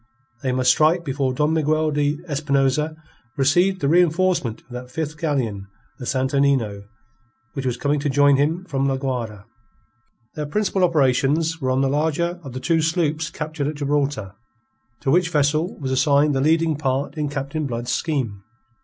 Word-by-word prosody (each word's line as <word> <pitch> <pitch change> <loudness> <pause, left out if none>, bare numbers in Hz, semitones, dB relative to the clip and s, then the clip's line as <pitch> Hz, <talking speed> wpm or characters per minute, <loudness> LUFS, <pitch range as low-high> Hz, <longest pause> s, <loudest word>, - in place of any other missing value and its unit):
They 130 -2 -1
must 130 0 +3
strike 165 +3 +3
before 135 -1 -1
Don 150 +4 +1
Miguel 155 0 +1
de 145 0 0
Espinosa 145 0 0 0.4
received 175 +8 +2
the - - +1
reenforcement 170 -6 +2
of - - -34
that 125 +1 -7
fifth 155 +2 -4
galleon, 130 -11 -2 0.3
the 125 - -6
Santo 130 +2 0
Nino, 115 -8 +1 0.7
which 135 -2 -3
was 125 -1 -1
coming 145 +3 0
to 145 +1 -1
join 145 +1 +4
him 160 +6 0
from 135 -5 -1
La 135 -1 0
Guayra. 120 -7 -4 0.9
Their 150 -1 -4
principal 195 +3 0
operations 155 +1 +2
were 130 - 0
on 130 +1 +2
the 135 - +2
larger 160 +5 0
of 135 -6 -9
the 130 - -4
two 165 +5 +1
sloops 160 -1 0
captured 155 -2 -4
at 150 - -3
Gibraltar; 140 -8 -1 0.7
to 135 - 0
which 175 +1 +3
vessel 155 +3 +1
was 135 -3 -4
assigned 145 +2 +3
the 135 - 0
leading 160 +1 +2
part 135 0 -1
in 150 -2 -2
Captain 145 +2 -3
Blood's 120 -1 -3
scheme. 120 - -2
145 Hz, 170 wpm, -22 LUFS, 130-155 Hz, 0.9 s, join